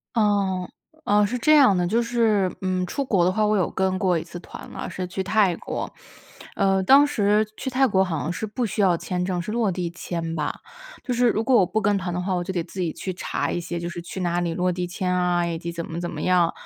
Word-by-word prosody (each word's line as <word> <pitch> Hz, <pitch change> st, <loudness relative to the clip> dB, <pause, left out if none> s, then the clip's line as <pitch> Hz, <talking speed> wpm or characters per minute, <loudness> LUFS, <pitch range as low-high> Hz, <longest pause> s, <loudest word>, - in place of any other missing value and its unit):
呃， 200 Hz, -4 st, +1 dB, 0.4 s
呃， 205 Hz, 0 st, +4 dB
是 250 Hz, +5 st, -2 dB
这 305 Hz, +5 st, +4 dB
样 260 Hz, -10 st, +6 dB
的， 180 Hz, -, +1 dB
就 220 Hz, +7 st, +1 dB
是， 225 Hz, -5 st, +1 dB
嗯， 185 Hz, -1 st, 0 dB
出 280 Hz, +6 st, -2 dB
国 195 Hz, -8 st, +2 dB
的 180 Hz, -, +3 dB
话， 215 Hz, +2 st, +1 dB
我 210 Hz, 0 st, +2 dB
有 185 Hz, -, +1 dB
跟 190 Hz, 0 st, 0 dB
过 180 Hz, -3 st, +2 dB
一 160 Hz, -, -3 dB
次 175 Hz, +1 st, -9 dB
团， -, -, -11 dB
啊， -, -, -5 dB
是 185 Hz, -, -4 dB
去 190 Hz, +2 st, -4 dB
泰 200 Hz, -3 st, +2 dB
国。 -, -, -5 dB, 0.6 s
呃， 195 Hz, -1 st, +2 dB
当 275 Hz, +8 st, +7 dB
时 210 Hz, -5 st, +2 dB
去 -, -, -3 dB
泰 260 Hz, +1 st, +3 dB
国 190 Hz, -3 st, +3 dB
好 170 Hz, -4 st, -2 dB
像 165 Hz, -, -2 dB
是 220 Hz, -, -3 dB
不 235 Hz, +4 st, -2 dB
需 215 Hz, -1 st, -2 dB
要 180 Hz, -3 st, +4 dB
签 180 Hz, +2 st, -3 dB
证， 180 Hz, -1 st, -1 dB
是 185 Hz, -, -5 dB
落 225 Hz, -3 st, +1 dB
地 175 Hz, -1 st, -3 dB
签 165 Hz, -1 st, -4 dB
吧。 150 Hz, -2 st, -2 dB, 0.5 s
就 250 Hz, -, -2 dB
是 245 Hz, 0 st, +3 dB
如 225 Hz, 0 st, 0 dB
果 255 Hz, +1 st, +3 dB
我 190 Hz, -, +5 dB
不 190 Hz, +5 st, -1 dB
跟 205 Hz, +1 st, +2 dB
团 180 Hz, -1 st, -3 dB
的 180 Hz, -, -2 dB
话， 185 Hz, +1 st, -1 dB
我 175 Hz, -1 st, -1 dB
就 190 Hz, -, -4 dB
得 175 Hz, -3 st, -1 dB
自 190 Hz, -, -10 dB
己 170 Hz, -, -1 dB
去 185 Hz, +4 st, -5 dB
查 180 Hz, -, -2 dB
一 -, -, -1 dB
些， 170 Hz, 0 st, -4 dB
就 170 Hz, -, -4 dB
是 175 Hz, 0 st, -6 dB
去 175 Hz, +2 st, -7 dB
哪 175 Hz, 0 st, 0 dB
里 170 Hz, -1 st, -1 dB
落 180 Hz, 0 st, +1 dB
地 180 Hz, 0 st, -3 dB
签 180 Hz, +1 st, -2 dB
啊， 180 Hz, -1 st, +1 dB
以 170 Hz, -1 st, -2 dB
及 170 Hz, -, -5 dB
怎 170 Hz, 0 st, -5 dB
么 165 Hz, +1 st, -5 dB
怎 175 Hz, -, -3 dB
么 150 Hz, -, -6 dB
样。 180 Hz, -2 st, +3 dB
185 Hz, 285 characters per minute, -24 LUFS, 175-210 Hz, 0.6 s, 当